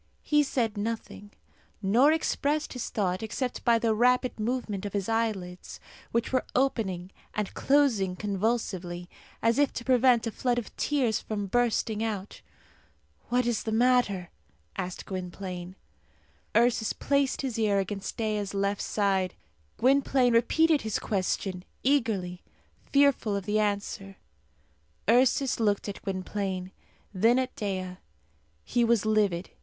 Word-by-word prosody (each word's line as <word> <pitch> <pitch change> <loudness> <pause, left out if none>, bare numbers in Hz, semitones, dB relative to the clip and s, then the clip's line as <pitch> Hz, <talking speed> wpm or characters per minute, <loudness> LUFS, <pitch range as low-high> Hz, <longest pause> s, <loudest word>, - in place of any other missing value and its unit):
He 295 -1 +3
said 235 -6 -1
nothing, 220 -1 -4 0.5
nor 230 +9 +4
expressed 305 -1 0
his 250 - -4
thought 185 -3 -1
except 245 +3 -3
by 235 -1 +4
the 225 -1 +1
rapid 250 +2 +2
movement 215 -3 -2
of 205 - -5
his 200 -2 -1
eyelids, 215 -6 -2 0.3
which 235 +2 -1
were 255 - +2
opening 195 -9 0 0.2
and 210 -2 -2
closing 245 -10 +2
convulsively, 190 -4 -2 0.4
as 230 +3 +3
if 290 -2 +3
to 235 - -5
prevent 250 -2 +4
a 225 - -2
flood 245 +2 0
of 240 - -5
tears 255 -7 +1
from 205 -2 -4
bursting 225 0 +1
out. 210 -3 -4 0.9
"What 250 0 +2
is 235 -3 0
the 220 - -3
matter?" 225 -6 +2 0.4
asked 185 -1 -5
Gwynplaine. 185 -1 -6 0.8
Ursus 235 -2 +3
placed 280 -1 0
his 245 -4 -2
ear 210 -2 +2
against 195 0 -3
Dea's 210 -3 -2
left 200 0 0
side. 195 -3 0 0.4
Gwynplaine 260 -1 +3
repeated 310 +6 +4
his 220 -1 -1
question 185 -2 -2 0.2
eagerly, 215 -10 +1 0.5
fearful 280 -7 +3
of 200 -2 -3
the 210 +2 +1
answer. 200 -2 -2 0.9
Ursus 255 +3 +3
looked 205 -2 +1
at 200 - -6
Gwynplaine, 190 -1 -3 0.4
then 225 +6 +4
at 260 0 -1
Dea. 185 -3 -3 0.7
He 240 0 +1
was 230 -2 +2
livid. 205 -5 +1
220 Hz, 130 wpm, -28 LUFS, 195-245 Hz, 0.9 s, nor